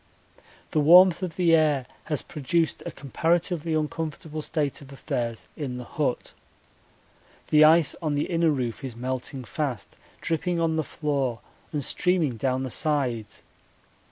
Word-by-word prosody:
The 155 - +2
warmth 175 +4 +7
of 180 -3 -4
the 175 -2 +3
air 150 -5 +3 0.2
has 150 -3 -2
produced 160 +2 -1
a - - -4
comparatively 165 +3 0
uncomfortable 155 0 -3
state 150 -3 -2
of 140 -1 -13
affairs 120 -4 -4
in 130 -5 -4
the 125 - -6
hut. 135 0 -2 1.2
The 155 0 +6
ice 160 -1 +5
on 155 -3 -1
the 145 - 0
inner 165 -2 +2
roof 130 -3 -2
is 130 -4 -5
melting 130 +2 -4
fast, 130 - -4 0.2
dripping 170 +1 -1
on 165 -1 +1
the 160 - 0
floor 140 -6 -2 0.3
and 150 -2 -2
streaming 170 -4 +1
down 130 +3 0
the 130 - -4
sides. 130 -8 -1
150 Hz, 145 wpm, -26 LUFS, 130-165 Hz, 1.2 s, warmth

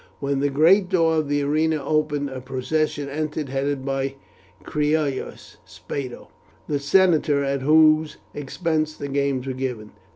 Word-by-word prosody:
When 140 0 -1
the 145 +1 +1
great 175 +7 +4
door 165 -4 +2
of 155 -2 0
the 145 0 +1
arena 155 +3 +1
opened 150 -2 0
a 130 -1 -6
procession 140 +3 -2
entered, 150 0 -3
headed 135 0 -2
by 135 0 -2 0.5
Cneius 150 -2 -2
Spado, 130 -3 -7 0.4
the 145 -2 -1
senator 150 -2 +3
at 140 0 -1
whose 155 +2 +4 0.2
expense 155 +2 -2
the 140 - -6
games 140 -2 -1
were 135 - -3
given. 125 -5 -5
145 Hz, 140 wpm, -23 LUFS, 135-155 Hz, 0.5 s, great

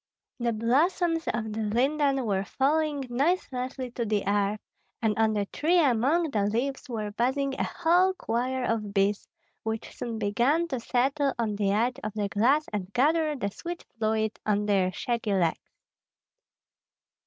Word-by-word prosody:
The 235 -1 +1
blossoms 325 - +1
of 220 -2 -2
the 220 - -4
linden 270 +5 +1
were 195 -3 0
falling 290 +4 0
noiselessly 255 -2 -1
to 240 - -3
the 210 -3 -1
earth, 205 +1 +1 0.4
and 220 -3 +1
on 220 -1 +2
the 205 -1 0
tree 320 - +1
among 290 +3 +3
the 210 -4 +1
leaves 265 +6 -2
were 215 -3 -3
buzzing 265 +5 0
a - - +2
whole 360 +3 +2
choir 250 -1 -1
of 215 -4 -2
bees, 200 +1 +1 0.3
which 220 0 -4
soon 230 -2 -4
began 240 +11 +1
to 260 - -2
settle 270 +4 +1
on 220 -3 -1
the 200 -1 0
edge 235 +5 +1
of 215 - -4
the 205 -2 -1
glass 260 +10 +3
and 195 -2 -3
gather 305 +3 +2
the 200 -7 -3
sweet 345 - -7
fluid 220 0 0
on 210 -1 +1
their 195 -3 +2
shaggy 230 +1 -1
legs. 170 -4 0
235 Hz, 155 wpm, -27 LUFS, 210-280 Hz, 0.4 s, among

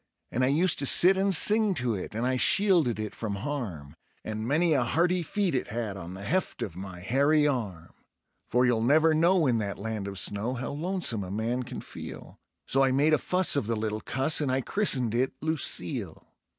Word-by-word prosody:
And 125 - 0
I - - +3
used 160 +6 +1
to 140 - 0
sit 185 +7 +5
and 195 +1 +1
sing 210 +2 +3
to 125 -6 -1
it, 100 +1 -6
and 115 +2 -1
I 130 0 +1
shielded 165 - +3
it 110 -1 -4
from 105 -3 -4
harm, 100 - -5 0.3
And 110 +1 -4
many 160 +4 +2
a 135 - +2
hearty 175 +8 +1
feed 190 +2 -1
it 130 - -1
had 110 -3 -4
on 90 -1 -8
the 95 - -9
heft 185 - -2
of 85 - -6
my 95 -1 -8
hairy 140 +9 +2
arm. 105 - -3 0.6
For 125 +1 +2
you'll 120 -2 +1
never 155 +6 +4
know 170 +2 +3
in 120 -4 +1
that 100 -2 -4
land 110 -1 -4
of 100 -1 -6
snow 105 +6 -2
how 125 - -5
lonesome 155 - -2
a 90 - -7
man 115 +5 -2
can 125 - -7
feel; - - -10 0.3
So 135 +1 +2
I 135 - +2
made 145 +4 +2
a 155 - +3
fuss 185 -2 +3
of 140 -7 -1
the 115 - 0
little 110 0 -3
cuss, 135 +5 0
and 140 -3 0
I 130 +1 0
christened 130 - +1
it 125 +3 0
"Lucille". 160 -1 -2
130 Hz, 210 wpm, -27 LUFS, 110-160 Hz, 0.6 s, sit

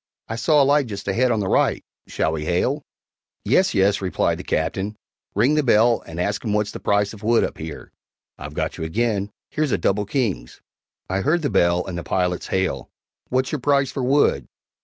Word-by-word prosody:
I 110 - -4
saw 145 +5 +4
a - - +3
light 145 -1 +3
just 100 -3 -7
ahead 120 +6 +2
on 110 -3 +1
the 95 - -2
right - - +2 0.2
shall - - 0
we 80 -1 -3
hail?" 125 - 0 0.6
"Yes, 140 - +3
yes," 100 +1 +3
replied 95 -1 0
the - - -6
Captain; 95 +6 -2 0.4
"ring 120 +9 +3
the 150 - +3
bell 120 -2 +4
and 80 +1 -7
ask 100 +3 -1
'em 110 -3 -1
what's 105 0 0
the - - -7
price 100 0 +1
of 105 - -12
wood 115 +2 +3
up - - -4
here, 80 -2 -8 0.4
(I've - - -9
got - - -3
you - - -3
again; 100 +3 -1 0.2
here's 155 -4 0
double 105 +1 0
kings.)" 105 - -2 0.5
I 95 +1 -1
heard 160 - +1
the 145 - 0
bell 85 0 +2
and 90 -2 -5
the - - -6
pilot's 90 -1 -1
hail, 95 0 -1 0.4
"What's' 130 +1 0
your 150 - -3
price 140 -1 +2
for 135 - -4
wood?" 125 - +2
105 Hz, 200 wpm, -22 LUFS, 95-130 Hz, 0.6 s, saw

